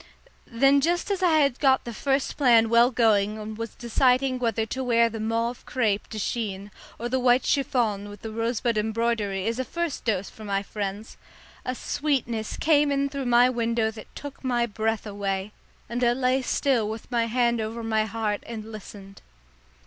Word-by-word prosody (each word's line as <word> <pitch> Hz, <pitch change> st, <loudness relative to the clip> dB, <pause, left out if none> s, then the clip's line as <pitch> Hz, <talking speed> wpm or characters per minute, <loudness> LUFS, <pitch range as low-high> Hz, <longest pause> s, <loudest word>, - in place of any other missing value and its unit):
Then 275 Hz, +4 st, +4 dB
just 345 Hz, +6 st, 0 dB
as 390 Hz, -, -1 dB
I 350 Hz, -4 st, +4 dB
had 275 Hz, -3 st, +1 dB
got 265 Hz, -2 st, +3 dB
the 235 Hz, -, -6 dB
first 270 Hz, +4 st, 0 dB
plan 235 Hz, -5 st, +5 dB
well 235 Hz, +1 st, +6 dB
going 215 Hz, -4 st, +2 dB
and 215 Hz, 0 st, -6 dB
was 230 Hz, 0 st, -6 dB
deciding 255 Hz, +2 st, +2 dB
whether 225 Hz, -2 st, 0 dB
to 260 Hz, +4 st, -4 dB
wear 235 Hz, -2 st, +3 dB
the 225 Hz, -, -6 dB
mauve 230 Hz, +2 st, -2 dB
crêpe 215 Hz, -5 st, 0 dB
de 220 Hz, -, -6 dB
Chine 205 Hz, -2 st, -3 dB, 0.3 s
or 235 Hz, -, -3 dB
the 260 Hz, +2 st, 0 dB
white 250 Hz, 0 st, +3 dB
chiffon 225 Hz, -7 st, 0 dB
with 205 Hz, -1 st, -12 dB
the 220 Hz, -, -5 dB
rosebud 230 Hz, 0 st, 0 dB
embroidery 215 Hz, -3 st, -1 dB
as 230 Hz, +2 st, -1 dB
a -, -, +1 dB
first 340 Hz, +3 st, -3 dB
dose 200 Hz, -4 st, 0 dB
for 220 Hz, -, -12 dB
my 200 Hz, -1 st, -1 dB
friends, 205 Hz, +1 st, -5 dB, 0.5 s
a 255 Hz, -, -3 dB
sweetness 240 Hz, -7 st, -2 dB
came 295 Hz, -2 st, +3 dB
in 280 Hz, 0 st, +1 dB
through 275 Hz, -2 st, -4 dB
my 240 Hz, +1 st, +6 dB
window 230 Hz, -2 st, 0 dB
that 215 Hz, -1 st, -11 dB
took 285 Hz, -1 st, -9 dB
my 240 Hz, -2 st, +1 dB
breath 220 Hz, 0 st, -2 dB
away, 200 Hz, -1 st, -3 dB, 0.4 s
and 240 Hz, +1 st, -2 dB
I 240 Hz, 0 st, +4 dB
lay 255 Hz, +1 st, +1 dB
still 250 Hz, -4 st, +1 dB
with 220 Hz, +3 st, -7 dB
my 235 Hz, -1 st, +1 dB
hand 235 Hz, 0 st, +1 dB
over 225 Hz, +2 st, -4 dB
my 220 Hz, -1 st, +1 dB
heart 215 Hz, -1 st, -2 dB
and 225 Hz, -1 st, -7 dB
listened. 200 Hz, -2 st, -11 dB
230 Hz, 185 wpm, -25 LUFS, 215-255 Hz, 0.5 s, well